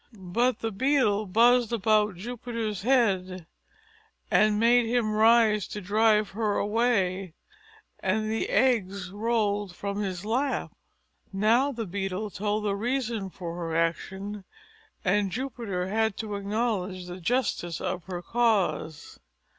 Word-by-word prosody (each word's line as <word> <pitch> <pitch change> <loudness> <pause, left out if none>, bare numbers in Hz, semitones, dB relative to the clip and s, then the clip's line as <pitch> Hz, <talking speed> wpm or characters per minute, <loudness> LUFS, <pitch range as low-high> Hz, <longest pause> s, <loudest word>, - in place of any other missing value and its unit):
But 220 +6 0
the 225 - -2
Beetle 215 -3 +1
buzzed 235 +4 +4
about 215 -2 +2
Jupiter's 225 0 -4
head, 190 -7 +1 0.9
and 210 0 +4
made 235 +1 +4
him 230 -2 +1
rise 215 -2 +4
to 210 - -6
drive 210 +1 +2
her 210 0 -1
away; 195 -5 0 0.6
and 215 +3 0
the 225 - -1
eggs 200 -7 +1
rolled 205 -3 -1
from 200 +2 -3
his 190 -1 -4
lap. 260 +6 -1 0.6
Now 225 +8 +2
the 230 -4 -4
Beetle 195 +2 -3
told 210 +3 -2
the 200 -1 0
reason 230 -2 -2
for 170 -2 -7
her 165 -2 -3
action, 190 +5 -2 0.6
and 195 +1 +2
Jupiter 230 -7 -3
had 220 0 0
to 215 -2 -4
acknowledge 200 -3 -2
the 180 +1 -8
justice 175 -6 -1
of 180 -1 -4
her 180 -2 -6
cause. 205 -9 0
210 Hz, 125 wpm, -27 LUFS, 190-230 Hz, 0.9 s, buzzed